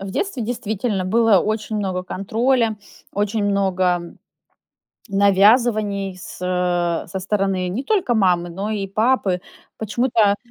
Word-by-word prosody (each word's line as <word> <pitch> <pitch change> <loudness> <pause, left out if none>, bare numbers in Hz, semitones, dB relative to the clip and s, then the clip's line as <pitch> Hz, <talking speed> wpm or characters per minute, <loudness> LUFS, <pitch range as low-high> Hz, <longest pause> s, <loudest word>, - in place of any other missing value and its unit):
В 195 0 -6
детстве 290 - -2
действительно 220 -3 -2
было 220 +1 +4
очень 215 +2 -2
много 190 -3 -2
контроля, 225 +5 0 0.4
очень 205 +1 -1
много 185 -3 0 0.9
навязываний 200 0 +3
с 180 - -10
со 180 0 -1
стороны 195 -1 -1
не 210 +9 -3
только 365 - +1
мамы, 180 -5 +2
но 195 +5 -4
и 205 -2 -2
папы. 205 -2 +1 0.4
Почему-то 220 -1 +1
200 Hz, 115 wpm, -21 LUFS, 185-220 Hz, 0.9 s, было